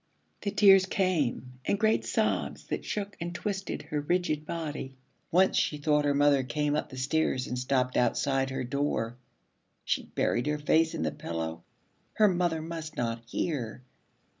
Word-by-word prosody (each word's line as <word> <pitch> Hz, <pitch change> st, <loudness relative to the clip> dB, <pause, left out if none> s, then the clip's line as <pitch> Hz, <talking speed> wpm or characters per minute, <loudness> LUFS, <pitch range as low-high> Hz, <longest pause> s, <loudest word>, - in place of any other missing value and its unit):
The 205 Hz, -, -1 dB
tears 195 Hz, -2 st, +6 dB
came, 145 Hz, -, 0 dB
and 200 Hz, -, 0 dB
great 220 Hz, 0 st, +3 dB
sobs -, -, 0 dB
that -, -, -2 dB
shook 205 Hz, 0 st, -4 dB
and 175 Hz, +1 st, -4 dB
twisted 195 Hz, 0 st, -3 dB
her 150 Hz, -1 st, -2 dB
rigid 155 Hz, -1 st, 0 dB
body. 150 Hz, -5 st, -5 dB, 0.3 s
Once 185 Hz, +3 st, +4 dB
she 150 Hz, -, +1 dB
thought 150 Hz, 0 st, +2 dB
her 145 Hz, -1 st, +2 dB
mother 145 Hz, -1 st, +4 dB
came 145 Hz, +4 st, -1 dB
up 150 Hz, -, -2 dB
the 130 Hz, -, -9 dB
stairs 135 Hz, -1 st, 0 dB
and 125 Hz, -, -4 dB
stopped 125 Hz, 0 st, 0 dB
outside 135 Hz, +2 st, +1 dB
her 130 Hz, -, -3 dB
door. 125 Hz, -3 st, -1 dB, 0.7 s
She -, -, 0 dB
buried 120 Hz, +4 st, 0 dB
her 150 Hz, 0 st, +1 dB
face 160 Hz, +2 st, +2 dB
in -, -, -2 dB
the 80 Hz, -, 0 dB
pillow. 80 Hz, 0 st, -5 dB, 0.5 s
Her 215 Hz, -, +5 dB
mother 175 Hz, -4 st, +1 dB
must 160 Hz, -2 st, -6 dB
not 115 Hz, -1 st, -1 dB
hear. 125 Hz, -2 st, -3 dB
150 Hz, 165 wpm, -29 LUFS, 130-170 Hz, 0.7 s, tears